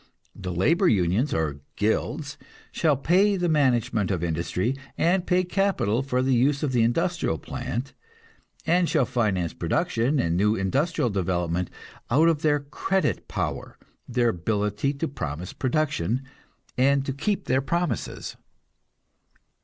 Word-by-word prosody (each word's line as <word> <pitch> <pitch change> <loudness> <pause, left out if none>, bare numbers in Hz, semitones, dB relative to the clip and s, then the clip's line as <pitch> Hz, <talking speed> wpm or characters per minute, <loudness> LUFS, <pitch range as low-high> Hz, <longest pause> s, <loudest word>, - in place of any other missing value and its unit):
The 95 -2 -5
labor 165 - +3
unions, 105 - +2
or 75 -3 -1 0.2
"guilds," 140 +7 -1 0.4
shall 155 -5 +2
pay 190 +8 +3
the 175 -1 0
management 125 - +2
of 90 -4 -1
industry 85 - -1 0.2
and 180 +2 +2
pay 180 0 +3
capital 180 - +1
for 130 -2 0
the 130 0 +2
use 135 +4 +2
of 145 - 0
the 120 -2 +2
industrial 120 - +1
plant, 125 - -5 0.7
and 175 +1 +3
shall 150 -6 +2
finance 100 -9 0
production 125 +6 0
and 85 -5 +1
new 105 +4 +3
industrial 125 - 0
development 90 -2 -1 0.4
out 155 +7 +5
of 155 -3 0
their 145 -2 +2
"credit 190 +7 -1
power," - - -4 0.3
their 120 -1 +2
ability 105 +5 -1
to 155 +3 -2
promise 85 - -5
production 130 - 0 0.6
and 135 +1 +3
to 135 - -2
keep 200 +9 -1
their 130 +1 +2
promises. 170 - -2
130 Hz, 135 wpm, -25 LUFS, 100-155 Hz, 0.7 s, out